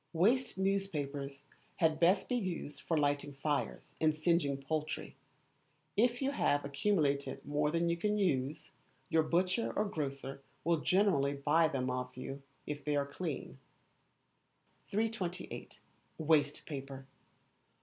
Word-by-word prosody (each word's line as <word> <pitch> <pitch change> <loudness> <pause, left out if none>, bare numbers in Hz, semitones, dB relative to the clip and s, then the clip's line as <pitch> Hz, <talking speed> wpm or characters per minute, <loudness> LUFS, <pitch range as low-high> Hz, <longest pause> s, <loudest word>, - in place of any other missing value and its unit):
Waste 225 +11 +3
newspapers 145 -8 -1 0.3
had 160 -3 +2
best 185 +3 +4
be 250 - 0
used 175 -9 -3
for 165 - 0
lighting 145 -1 +1
fires 135 - -2
and 155 -1 +4
singeing 155 -3 +2
poultry. 155 +2 -3 0.8
If 240 +4 +3
you 270 - +2
have 145 - +2
accumulated 140 -2 +1
more 150 +1 +1
than 170 +2 +1
you 170 - +2
can 210 +5 0
use, 145 -7 0 0.4
your 160 - +4
butcher 180 +7 +1
or 210 - +2
grocer 140 -6 -4 0.2
will 170 +1 +3
generally 180 -7 +3
buy 150 +4 +4
them 130 -4 -1
of 125 0 -4
you 135 +2 -6 0.2
if 145 -1 -4
they 150 -1 0
are 140 -1 +2
clean. 140 - -5 1.3
328. 205 -4 -3 0.4
Waste 150 -2 +2
Paper. 135 -2 -6
155 Hz, 130 wpm, -34 LUFS, 140-185 Hz, 1.3 s, best